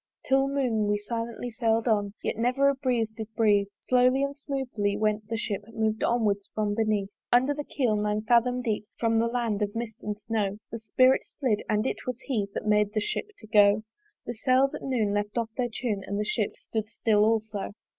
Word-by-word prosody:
Till 270 0 +3
noon 250 -7 0
we 205 0 +2
silently 230 +3 -4
sail'd 225 0 +1
on 205 -2 +1
Yet - - -1
never 255 +5 +2
a - - +2
breeze 250 -5 0
did 220 -1 -5
breathe: 205 -3 +3 0.2
Slowly 255 +2 +3
and 280 0 -2
smoothly 260 -8 -2
went 215 0 0
the 225 0 -2
ship 205 -3 -3
Mov'd 220 -1 -1
onward 220 -4 +2 0.2
from 210 -1 0
beneath. 210 -2 0 0.2
Under 260 +4 +4
the 295 +1 -4
keel 250 -7 0
nine 210 0 0
fathom 245 +2 +3
deep 215 -3 -2
From 225 -1 +2
the 230 - +2
land 230 -3 -1
of 205 0 -1
mist 230 -2 -4
and 210 0 -4
snow 210 -2 -1
The 230 - -5
spirit 255 +4 +4 0.2
slid: 240 -7 +1
and 215 +1 +1
it - - -3
was 250 -2 -2
He 220 -8 -1
That - - -3
made 210 -1 +2
the - - +3
Ship 210 - -2
to - - -13
go. 210 0 +5 0.4
The 240 - -4
sails 255 +4 +2
at - - -5
noon 230 -6 0
left 205 +2 -2
off 230 -1 -1
their 245 -2 -1
tune 220 -4 -2
And 200 +1 -2
the 210 - 0
Ship 210 -1 -1
stood 220 -1 -4
still 215 -2 +2
also. 215 -2 -1
225 Hz, 205 wpm, -27 LUFS, 210-245 Hz, 0.4 s, go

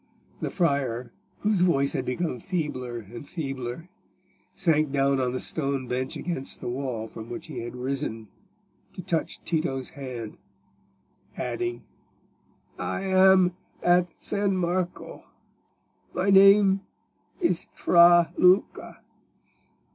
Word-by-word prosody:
The - - -1
friar, 135 -9 -1 0.3
whose 210 -3 +1
voice 140 -6 +2
had 130 - -2
become 125 +1 -2
feebler 130 -9 -3
and 120 +5 -10
feebler, 135 -1 -5 0.7
sank 155 -6 +2
down 140 -1 +2
on 125 -1 0
the 130 - -3
stone 140 -4 -2
bench 130 +2 -3
against 170 -7 -4
the - - -5
wall 125 -3 -3
from 110 +1 -10
which 120 - -6
he - - -7
had 120 +1 -6
risen 125 -3 -3 0.7
to 185 - -8
touch 170 -3 -2
Tito's 155 -6 -2
hand, 125 -6 -7 1.0
adding— 360 0 -3 1.0
"I - - -3
am 190 -1 +5 0.3
at 175 0 +3
San 200 -2 -1
Marco; 180 0 -3 0.9
my 190 +2 +1
name 195 0 +6 0.6
is 340 - 0
Fra 170 -1 +6
Luca." 180 +2 +2
155 Hz, 115 wpm, -26 LUFS, 130-180 Hz, 1.0 s, name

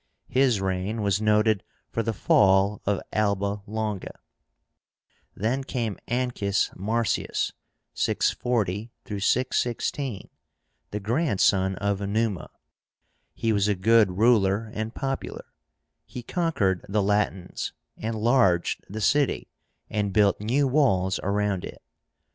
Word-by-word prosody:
His 130 -4 +3
reign 95 +3 -2
was 100 0 +1
noted 105 -1 +3 0.3
for 115 - 0
the 115 - -1
fall 95 +1 +3
of 100 -1 +1
Alba 100 -1 0
Longa. 105 -2 -4 1.2
Then 120 +7 -1
came 115 -6 -3
ANCUS 120 -5 0
MARCIUS 110 +4 -1 0.4
(640 110 -2 0
616), 120 +2 -1 0.6
the 105 - -4
grandson 100 - +2
of 100 +1 -1
Numa. 100 -2 -1 0.9
He 115 -1 0
was 100 0 +2
a 105 - +2
good 105 -1 +3
ruler 110 -1 +3
and 110 +2 -4
popular. 135 -1 -4 0.6
He 125 - -8
conquered 115 - 0
the 105 0 +1
Latins, 100 -2 -1 0.2
enlarged 110 -5 +1
the 110 +3 -5
city, 140 +5 +1 0.4
and 105 -2 -1
built 100 -1 +3
new 130 +6 +2
walls 95 -10 +2
around 100 -1 0
it. - - -9
105 Hz, 105 wpm, -26 LUFS, 100-115 Hz, 1.2 s, His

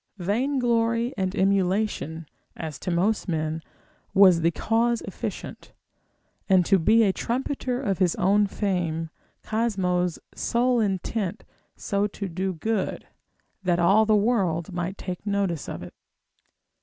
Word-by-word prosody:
Vainglory 235 +3 +1
and 190 -1 -2
emulation 190 -4 0 0.3
(as 160 -2 -6
to 185 - -4
most 190 +6 +1
men) 160 -1 -2 0.5
was 185 -4 +7
the 165 - +4
cause 230 +7 +1
efficient, - - -7 0.8
and 185 -2 +5
to 195 +1 +4
be 220 +7 +5
a 195 -3 +3
trumpeter 250 +2 -2
of 200 -9 -1
his 180 -3 +2
own 205 +2 +3
fame, 170 -6 -2 0.3
Cosmo's 185 -6 0 0.2
sole 245 +1 +1
intent 195 -1 -2 0.3
so 200 +1 -1
to 200 -1 -6
do 190 +2 -2
good, 195 +4 -2 0.6
that 180 -2 +1
all 195 +5 +4
the 215 - +5
world 195 -6 +1
might 180 +2 -3
take 180 -1 -6
notice 200 -6 -1
of - - -6
it. - - -10
195 Hz, 130 wpm, -25 LUFS, 175-220 Hz, 0.8 s, was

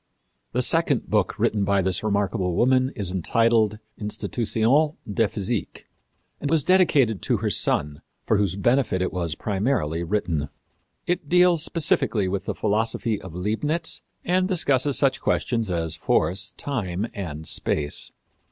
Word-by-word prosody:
The - - +1
second - - +1
book - - +1
written 105 -2 +1
by 100 -1 +2
this 95 0 +1
remarkable 100 -3 0
woman 130 +3 +3
is 95 -5 -2
entitled 110 +3 +2 0.2
Institutions 115 +7 0 0.2
de 115 +1 +2
Physique, 105 +2 -4 0.5
and 145 - -3
was 160 -2 +2
dedicated 145 - +3
to - - +1
her - - -1
son, 75 0 0 0.2
for 110 - +2
whose 100 -3 0
benefit 120 -1 +1
it - - -3
was 85 -4 -2
primarily 95 - -1
written. 85 -6 -1 0.6
It 175 -4 -2
deals 180 -2 +4
specially 120 - +1
with 95 +1 -3
the - - -3
philosophy 110 0 -1
of 90 -3 -10
Leibnitz 145 - -1 0.2
and 185 +1 +2
discusses 145 -7 +2
such 135 -1 +2
questions 115 -4 0
as 85 -2 -2
force, 95 +3 0
time 100 -8 -3
and 80 -6 -6
space. 75 -1 0
105 Hz, 140 wpm, -24 LUFS, 95-130 Hz, 0.6 s, deals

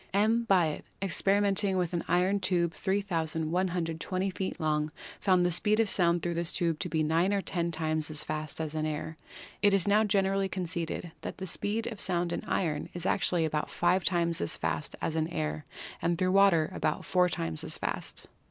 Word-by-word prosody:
M. 225 +3 +3
Biot, 170 -6 +3 0.2
experi 195 +1 +2
menting 195 -1 +2
with 180 -1 -1
an 170 - -1
iron 180 +4 +2
tube 175 -3 +1
3,120 175 -1 -1
feet 185 +1 -4
long, 150 -1 0 0.3
found 185 -3 +3
the 175 - +2
speed 210 +5 +2
of 225 - +3
sound 175 -3 +2
through 175 - -1
this 170 0 0
tube 165 -4 -1
to 180 - -3
be 160 -1 +1
9 165 +5 +2
or 200 -1 0
10 170 -2 -1
times 155 -1 -1
as 150 -1 0
fast 155 -1 -4
as 160 -1 -3
in 155 0 -1
air. 155 +1 -4 0.5
It 205 -1 +5
is 195 -2 +1
now 210 +2 +4
generally 195 -1 +1
conceded 175 -2 -2
that - - -6
the 190 - -5
speed 210 +5 -1
of 220 -3 -5
sound 175 -3 0
in - - -3
iron 155 -5 -1
is 175 0 -4
actually 180 -4 +2
about 155 -1 -2
five 175 +2 +2
times 170 -2 +1
as 85 - 0
fast - - -3
as 160 - -1
in 160 0 +1
air 75 - -3 0.4
and 170 0 +1
through 185 0 +1
water 190 -5 +4
about 155 - -1
four 180 -1 +3
times 80 - -1
as - - -1
fast. - - -4
175 Hz, 195 wpm, -29 LUFS, 160-195 Hz, 0.5 s, It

